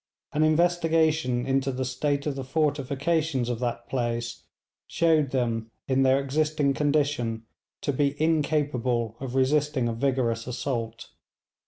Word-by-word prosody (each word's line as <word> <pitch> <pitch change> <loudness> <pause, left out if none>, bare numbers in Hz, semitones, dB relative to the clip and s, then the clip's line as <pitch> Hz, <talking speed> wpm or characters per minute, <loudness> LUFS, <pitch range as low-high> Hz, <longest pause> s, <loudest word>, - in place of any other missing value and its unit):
An 150 - +1
investigation 160 -5 +2
into 135 0 +1
the 130 0 -3
state 140 +3 -1
of 145 -2 -1
the 135 - -4
fortifications 145 -1 0
of 120 -2 -2
that 120 -1 -3
place 120 -2 -2 0.5
showed 160 -4 +2
them, 115 -3 -1 0.2
in 135 -1 +2
their 135 0 +4
existing 145 +1 +1
condition, 140 -6 0 0.4
to 145 - -1
be 140 +1 0
incapable 145 -7 0
of 130 -1 -5
resisting 135 -1 +2
a 115 - -1
vigorous 115 -2 0
assault. 120 -2 -4
135 Hz, 130 wpm, -26 LUFS, 120-150 Hz, 0.5 s, their